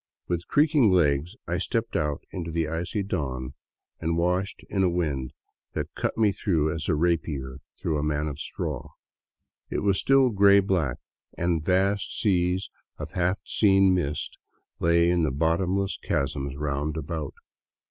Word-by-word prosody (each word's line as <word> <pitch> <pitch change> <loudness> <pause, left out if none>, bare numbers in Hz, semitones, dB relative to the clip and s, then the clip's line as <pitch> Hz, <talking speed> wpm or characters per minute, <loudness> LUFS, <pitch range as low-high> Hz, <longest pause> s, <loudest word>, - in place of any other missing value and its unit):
With 85 -1 -2
creaking 145 -6 +4
legs 85 0 +2
I 85 +1 -1
stepped 115 +4 -2
out 75 -2 -1
into 85 -3 -5
the 80 -1 -1
icy 85 +6 -2
dawn, 65 -9 -3 0.5
and 80 +1 -1
washed 90 +3 0
in 100 - -1
a 95 - +4
wind 75 -7 -1 0.4
that - - -4
cut - - -2 0.2
through 80 -8 +1
me - - -1
as 80 -2 -4
a 80 - +3
rapier 75 -5 -1 0.2
through 80 -3 -1
a - - -1
man 75 0 0
of 75 -1 -5
straw. - - -4 0.8
It - - -2
was 100 -2 +2
still 135 -2 +4
gray 100 -1 +6
black, 90 -10 0 0.4
and 85 -2 0
vast 95 +3 +1
seas 90 -2 +1 0.3
of - - -7
half 90 +2 0
seen 95 -2 +4
mist 80 -5 -2 0.4
lay 85 0 +4
in 90 -1 +2
the 80 - +2
bottomless 90 +7 0
chasms 70 0 -2
roundabout. 75 +1 -3
85 Hz, 150 wpm, -26 LUFS, 75-95 Hz, 0.8 s, gray